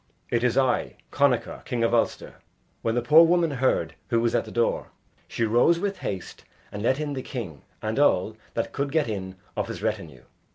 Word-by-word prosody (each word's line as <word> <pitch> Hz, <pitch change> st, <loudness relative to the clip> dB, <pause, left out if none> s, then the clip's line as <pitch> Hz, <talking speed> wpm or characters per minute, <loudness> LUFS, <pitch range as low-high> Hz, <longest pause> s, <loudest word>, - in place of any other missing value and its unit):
"It 120 Hz, 0 st, +1 dB
is 125 Hz, 0 st, +2 dB
I, 130 Hz, -2 st, +1 dB, 0.2 s
Connachar, -, -, +1 dB
king 120 Hz, -1 st, -2 dB
of 115 Hz, -, +2 dB
Ulster." 115 Hz, -, 0 dB, 0.4 s
When 115 Hz, 0 st, 0 dB
the 120 Hz, -, 0 dB
poor 155 Hz, +7 st, +8 dB
woman 170 Hz, -1 st, +3 dB
heard 125 Hz, -11 st, +1 dB
who 115 Hz, -, +2 dB
was 115 Hz, 0 st, +1 dB
at -, -, +1 dB
the -, -, -9 dB
door, 120 Hz, 0 st, 0 dB, 0.4 s
she -, -, -2 dB
rose 120 Hz, +10 st, +4 dB
with 200 Hz, +2 st, -2 dB
haste 95 Hz, -3 st, -5 dB, 0.3 s
and 105 Hz, -, -6 dB
let 130 Hz, +5 st, +1 dB
in 150 Hz, -1 st, -2 dB
the 130 Hz, -, -3 dB
king 100 Hz, -, -6 dB, 0.2 s
and 110 Hz, +4 st, -1 dB
all 110 Hz, -6 st, +3 dB, 0.2 s
that 115 Hz, -, -2 dB
could 140 Hz, 0 st, -2 dB
get 155 Hz, -2 st, +2 dB
in 95 Hz, -3 st, -4 dB, 0.2 s
of -, -, -1 dB
his -, -, -6 dB
retinue. 65 Hz, 0 st, -3 dB
120 Hz, 200 wpm, -25 LUFS, 110-140 Hz, 0.4 s, poor